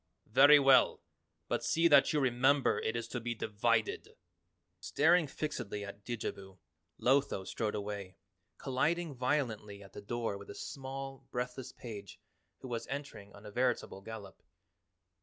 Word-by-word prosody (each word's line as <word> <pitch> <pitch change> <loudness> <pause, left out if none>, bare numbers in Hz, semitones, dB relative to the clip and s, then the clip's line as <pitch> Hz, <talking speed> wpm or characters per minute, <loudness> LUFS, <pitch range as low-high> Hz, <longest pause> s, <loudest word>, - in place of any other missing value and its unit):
"Very 140 +5 +8
well, 135 -2 +5 0.4
but - - -1
see 165 +1 +3
that 145 -4 +6
you 150 - +2
remember 135 +2 +3
it 110 - -2
is 115 -1 -3
to 120 - -3
be 120 +1 -3
divided!" 110 +1 -1 0.6
Staring 165 +2 +3
fixedly 120 -9 -4
at 100 0 -10
Didjabo, 100 -5 -5 0.4
Lotho 130 -7 +2
strode 110 +1 -2
away, 100 -2 -5 0.4
colliding 155 +5 0
violently 115 -6 -2
at 95 - -15
the - - -8
door 115 -1 -3
with 100 - -12
a 100 - -8
small 135 -1 -7
breathless 125 +1 -4
page 105 -4 -9 0.4
who 130 - -7
was 115 -2 -4
entering 135 -8 -6
on 100 +1 -14
a 105 - -8
veritable 120 -4 -1
gallop. 100 -3 -9
120 Hz, 140 wpm, -33 LUFS, 105-135 Hz, 0.6 s, Very